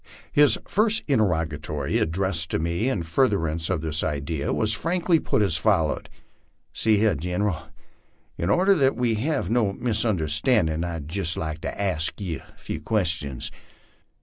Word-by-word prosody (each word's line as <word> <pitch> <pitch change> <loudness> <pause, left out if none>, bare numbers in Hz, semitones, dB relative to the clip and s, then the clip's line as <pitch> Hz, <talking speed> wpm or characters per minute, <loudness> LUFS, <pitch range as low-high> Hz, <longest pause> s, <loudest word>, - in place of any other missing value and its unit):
His 145 -1 +5
first 220 +2 +2
interrogatory, 80 - 0
addressed 80 -1 0
to - - 0
me 85 +9 -1
in 100 -10 -1
furtherance 80 -4 0
of 80 - 0
this 80 0 -2
idea, 75 0 -2
was 110 -1 +1
frankly 165 - +1
put 110 - +1
as 85 -6 +1
follows: 85 -5 +1 0.3
" 80 0 -43
See 110 +2 +2
hyar, 110 0 +3
Gineral, 90 +2 -2 0.7
in 85 - -2
order 190 - +4
that 135 -7 +2
we 120 -1 +1
hev 120 - -1
no 110 -5 +2
misonderstandin', 95 - +1
I'd 85 -4 -4
jest 85 0 0
like 80 0 -4
to - - -5
ask 90 -4 -1
ye 90 -5 -3
a - - -19
few - - -6
questions." 80 - 0
90 Hz, 150 wpm, -24 LUFS, 80-110 Hz, 0.7 s, His